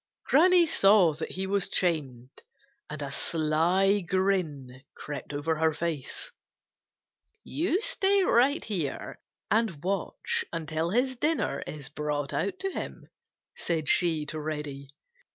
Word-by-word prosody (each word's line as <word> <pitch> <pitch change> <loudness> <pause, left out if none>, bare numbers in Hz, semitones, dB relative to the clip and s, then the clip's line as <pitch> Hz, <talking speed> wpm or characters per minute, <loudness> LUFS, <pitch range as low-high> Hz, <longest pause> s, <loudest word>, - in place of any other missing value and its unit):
Granny 350 +4 +5
saw 195 - +5
that 155 - -5
he 190 +1 -2
was 195 -1 0
chained 135 -8 -1 0.5
and 150 -1 -5
a 140 - -5
sly 170 +7 +2
grin 170 -9 -1
crept 145 -1 -7
over 150 +2 -1
her 160 0 +2
face. 155 -3 -4 1.1
"You 345 +4 0
stay 400 -5 +2
right 280 +1 +3
here 170 -10 -3 0.3
and 215 -10 +1
watch 195 0 -1
until 160 0 -2
his 255 +6 +1
dinner 315 +5 0
is 145 -3 -7
brought 145 -1 -3
out 380 - -1
to 385 0 -2
him," - - -7 0.5
said 160 -3 -2
she 160 -4 +3
to 155 +1 -5
Reddy. 150 -2 -5
165 Hz, 125 wpm, -28 LUFS, 150-210 Hz, 1.1 s, Granny